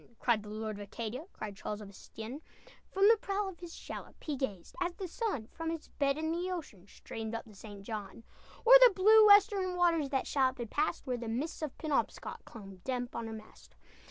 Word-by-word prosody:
Cried 235 -3 +2
the 210 - -10
Lord 215 0 -4
of - - -8
Acadia, 230 - -5
Cried 210 -2 -7
Charles 210 +1 -5
of 210 - -9
Estienne! 225 +7 -9 0.5
From 390 +1 +4
the 455 +1 +7
prow 400 0 -1
of 380 -3 -8
his 345 -2 -9
shallop - - -8
He 300 - -2
gazed, 205 -10 -4
as 350 -1 -1
the 385 - -5
sun 385 - -2
From 330 0 -4
its 330 -1 -5
bed 280 0 0
in 315 +1 -1
the 350 +2 -2
ocean, 280 - -6
Streamed 225 +2 -6
up 230 - -5
the 220 - -15
St. 200 0 -11
John. 210 +1 -6 0.4
O'er 480 - +8
the 460 - -1
blue 430 +3 +7
western 405 -3 +5
waters 335 -5 +2
That 270 -1 0
shallop 260 -2 +1
had 235 -3 -6
passed, 300 0 -1
Where 250 -2 -1
the 235 -1 -6
mists 260 +10 -3
of 305 -4 -4
Penobscot 305 -4 -2
Clung 195 -4 -11
damp 250 -2 -3
on 230 -1 -3
her 225 - -6
mast. 215 -1 -13
265 Hz, 215 wpm, -32 LUFS, 220-350 Hz, 0.5 s, O'er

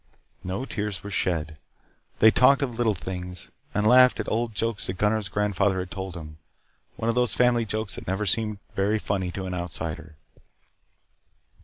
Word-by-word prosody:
No 95 +8 -3
tears 105 -7 -3
were 100 - -6
shed. 80 -5 -1 0.6
They 110 - +7
talked 140 +4 +5
of 125 -4 -3
little 115 -3 +1
things, 90 -1 -6 0.2
and 105 +1 0
laughed 125 +3 +6
at - - -2
old 115 0 -1
jokes 115 0 -1
that 95 - -2
Gunnar's 105 -1 +1
grandfather 100 -1 +1
had 90 -1 -4
told 95 -2 -5
them. 75 -2 -9 0.6
One 115 - -3
of 115 - +3
those 125 0 +1
family 120 -2 +3
jokes 110 -1 -3
that - - -9
never 95 +3 -1
seem 105 +2 0 0.2
very 100 +3 +2
funny 95 -3 -2
to 95 - -4
an 90 - -4
outsider. 80 -3 -5
100 Hz, 170 wpm, -26 LUFS, 90-110 Hz, 0.6 s, They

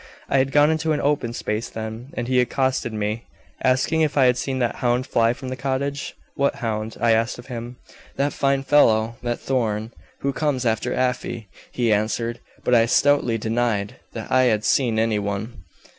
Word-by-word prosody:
I 135 - +3
had 135 +1 +1
gone 145 +2 +5
into 160 0 0
an 150 - 0
open 140 -5 0
space, 110 -1 -3
then, 110 +3 -6
and 120 - -3
he 130 -1 +3
accosted 130 -1 0
me, 105 +1 -3 0.4
asking 130 +5 +2
if 150 -2 +1
I 135 - +6
had 125 -1 +4
seen 130 +1 -2
'that 120 -2 -1
hound' 125 +1 +1
fly 115 -4 +2
from 130 +1 -6
the 130 - -3
cottage? 140 +2 -3 0.2
'What 140 0 +1
hound?' 110 -2 -3
I 115 0 +3
asked 115 +1 +1
of 120 - -11
him. 120 +1 -6 0.4
'That 140 +1 0
fine 140 -1 +1
fellow, 115 -5 +3
that 120 0 -2
Thorn, 110 -4 -1 0.3
who 140 0 0
comes 140 -4 -1
after 115 +2 0
Afy,' 125 -4 -2 0.2
he 120 -3 +1
answered, 115 +3 -1 0.2
but 125 - +1
I 115 -1 +5
stoutly 130 -2 +3
denied 110 -2 -1 0.2
that - - -7
I 130 0 +5
had 110 -3 +1
seen 120 -5 +2
any 110 -1 +2
one. 100 0 -5
120 Hz, 190 wpm, -23 LUFS, 115-135 Hz, 0.4 s, I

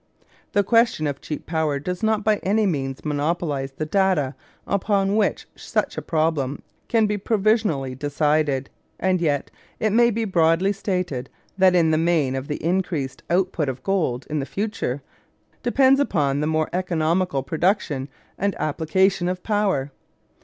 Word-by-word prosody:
The 205 - +3
question 230 -6 +3
of 140 -2 -3
cheap 150 - -6
power 160 -3 0
does 180 +5 -4
not 220 -1 +1
by 215 0 +3
any 210 +3 +1
means 135 -7 -2
monopolise 150 -2 -1
the 155 - -3
data 170 -6 +1 0.3
upon 200 0 +1
which 215 -1 0
such - - -2
a - - -3
problem 155 -4 -1 0.2
can 225 -2 +3
be 210 0 -1
provisionally 205 - +1
decided; 145 0 0 0.3
and 185 -1 +1
yet 145 -4 0 0.3
it 215 - +1
may 235 +1 +5
be 225 0 -1
broadly 175 +1 +3
stated 180 -10 -3 0.3
that 185 -1 +5
in 165 -2 +4
the 155 - +2
main 160 -5 +2
the 145 0 -5
increased 170 -7 -1
output 175 -4 +1
of 130 0 -6
gold 155 -10 0
in 155 0 -2
the 135 - -3
future 195 - -3 0.6
depends 265 +2 +4
upon 145 - +1
the 150 - 0
more 155 0 0
economical 170 -4 0
production 155 -2 0 0.3
and 200 +1 0
application 175 +4 +1
of 180 0 -4
power. 195 -11 0
170 Hz, 150 wpm, -23 LUFS, 145-200 Hz, 0.6 s, may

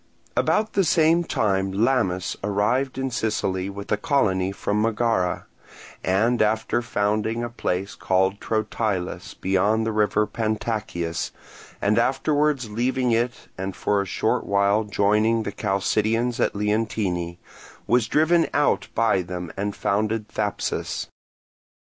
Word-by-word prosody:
About 215 0 +1
the 195 - +3
same 165 +1 +4
time 95 - 0
Lamis 100 -4 +1
arrived 105 +7 0
in 135 0 -2
Sicily 95 -5 -1
with 100 0 -8
a 105 - +3
colony 95 -7 +1
from 105 +1 -1
Megara, 110 -4 0 0.6
and 110 +6 +2
after 110 +2 +1
founding 110 +1 -1
a 120 - -4
place 95 -4 -2
called 95 +2 +1
Trotilus 110 -4 -2
beyond 100 +4 +1
the 115 - 0
river 105 0 +2
Pantacyas, 110 -7 -2 0.5
and 105 +3 +2
afterwards 140 +1 +1
leaving 125 +2 0
it 120 +2 -1
and 95 0 -3
for 100 -1 +1
a - - -3
short - - 0
while 100 +2 +2
joining 105 +2 +2
the 100 - -3
Chalcidians 110 +4 0
at - - +1
Leontini, 105 -5 -1 0.5
was 120 -1 +2
driven 160 +5 +3
out 145 0 +2
by 115 -5 +3
them 90 -1 -6
and 100 +1 -3
founded 110 +1 0
Thapsus. 105 -2 -2
105 Hz, 125 wpm, -24 LUFS, 100-120 Hz, 0.6 s, same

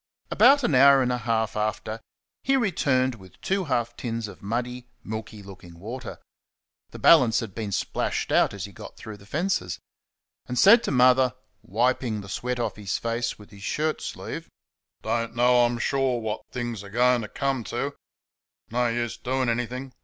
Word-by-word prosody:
About 280 0 +6
an 155 - +1
hour 135 +1 +7
and 125 - 0
a 125 - -1
half 110 -1 -1
after 110 +1 -2 0.4
he 270 0 +2
returned 140 - +1
with 95 -5 -15
two 195 -1 -1
half 120 -4 -1
tins 115 -2 -4
of - - -12
muddy, 125 +4 -3 0.2
milky 110 -1 -7
looking 90 -3 -13
water 115 +7 -7 0.7
the - - -10
balance 115 -3 +6
had 110 -5 -6
been 110 -1 -4
splashed - - -2
out - - +4
as 100 -3 -6
he 100 - -11
got - - -11
through 110 -1 -9
the 100 0 -17
fences 145 - -1 0.7
and 125 - -4
said 215 - +7
to - - -1
Mother 130 -1 +4 0.3
(wiping 115 0 0
the 95 - -11
sweat 125 +5 -3
off 120 - -2
his 100 -3 -2
face 115 0 -2
with 105 - -16
his 100 -1 -14
shirt 155 +9 -1
sleeve) - - -6 0.5
"Don't 115 +1 -2
know, 125 0 +5
I'm 120 0 -1
SURE, 130 0 0
what 110 -1 -4
things 120 -4 -4
are 100 - -10
going 120 +2 +3
t' 105 - -5
come 135 +1 -2
t';...no 125 -1 -5
use 120 0 -2
doing 130 0 -1
anything... 125 +3 -3
120 Hz, 175 wpm, -25 LUFS, 110-130 Hz, 0.7 s, hour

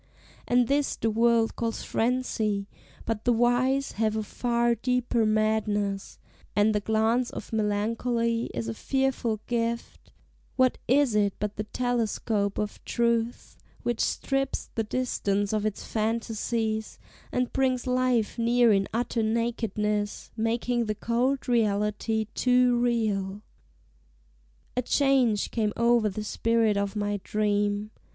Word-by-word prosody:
And 245 -1 +3
this 285 +1 +1
the 225 - -1
world 230 0 +3
calls 230 -1 -3
frenzy; 220 -4 0 0.4
but 225 -2 -2
the 245 - +3
wise 245 +4 +2
Have 215 0 0
a 220 - -1
far 235 +2 +1
deeper 240 -1 0
madness, 215 -2 0 0.4
and 210 +1 +4
the 210 - +2
glance 220 +4 +1
Of - - -8
melancholy 230 +2 0
is 115 -1 -4
a 115 - -2
fearful 255 - -1
gift; 235 -1 -3 0.4
What 255 -1 +2
is 270 -1 +3
it 205 -2 +2
but 210 0 -3
the 210 - -3
telescope 220 -3 -1
of 210 -1 -4
truth, 235 0 -1 0.2
Which 240 -2 -1
strips 270 0 -1
the 225 - 0
distance 205 -4 -1
of 215 0 +1
its 210 - -5
fantasies, 220 0 -2 0.3
And 250 -1 -1
brings 260 -2 +1
life 250 -3 +1
near 235 -1 +4
in 195 -1 +1
utter 235 +1 -1
nakedness, 220 -2 -1
Making 235 +1 0
the 215 0 -2
cold 250 +5 0
reality 220 -1 +1
too 250 -1 +3
real! 210 -4 0 1.3
A 250 - +1
change 255 -5 +2
came 215 -3 0
o'er 235 -2 +3
the 210 +2 -5
spirit 225 0 +1
of 200 +1 -1
my 205 -1 -1
dream. 205 0 0
225 Hz, 130 wpm, -27 LUFS, 210-245 Hz, 1.3 s, and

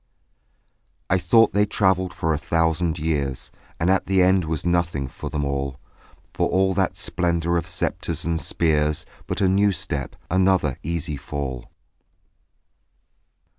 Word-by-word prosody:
I 95 - +4
thought 115 +6 +4
they 105 0 +3
travelled 95 -3 +1
for 80 0 -1
a - - 0
thousand 80 +2 +1
years; 75 -5 -2 0.3
And 85 - +1
at 95 - +1
the 95 -1 +4
end 95 -1 +3
was 80 0 -3
nothing 85 -5 0
for - - -7
them 75 -1 -2
all, 70 -1 -3 0.5
For - - 0
all 95 0 +2
that 95 -1 0
splendour 85 -1 0
of 85 - -1
sceptres - - -1
and 85 0 0
of - - -5
spears, 75 -3 +1 0.2
But - - -3
a 95 - +4
new 100 +2 +3
step, 80 -6 -4 0.2
another 95 -7 +2
easy 80 -2 -3
fall. 65 -3 -5
85 Hz, 145 wpm, -23 LUFS, 75-95 Hz, 0.5 s, I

